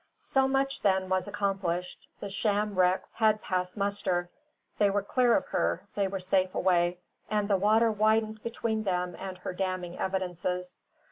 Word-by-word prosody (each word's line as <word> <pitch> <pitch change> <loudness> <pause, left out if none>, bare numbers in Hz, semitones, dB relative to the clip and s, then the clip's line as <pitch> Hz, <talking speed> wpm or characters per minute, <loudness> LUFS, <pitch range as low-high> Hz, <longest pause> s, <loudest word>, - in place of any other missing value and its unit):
So 265 0 +1
much, 270 0 0
then, 190 -2 +2
was 185 +1 0
accomplished. 195 -3 -2
The 200 - -4
sham 210 +1 0
wreck 185 0 +3
had 215 -1 +3
passed 180 -1 -2
muster; 190 -3 -1 0.5
they 205 -1 +5
were 200 0 0
clear 245 +2 +3
of - - -3
her, 180 +4 0
they 200 -1 +1
were 195 0 -4
safe 185 0 +1
away; 175 -1 +2 0.3
and 210 -1 +1
the 200 -2 +3
water 220 +4 +4
widened 215 0 +1
between 230 -1 -2
them 180 -3 -1
and 190 -1 -6
her 180 - -5
damning 185 -2 -3
evidences. 180 -1 -2
195 Hz, 160 wpm, -29 LUFS, 180-215 Hz, 0.5 s, they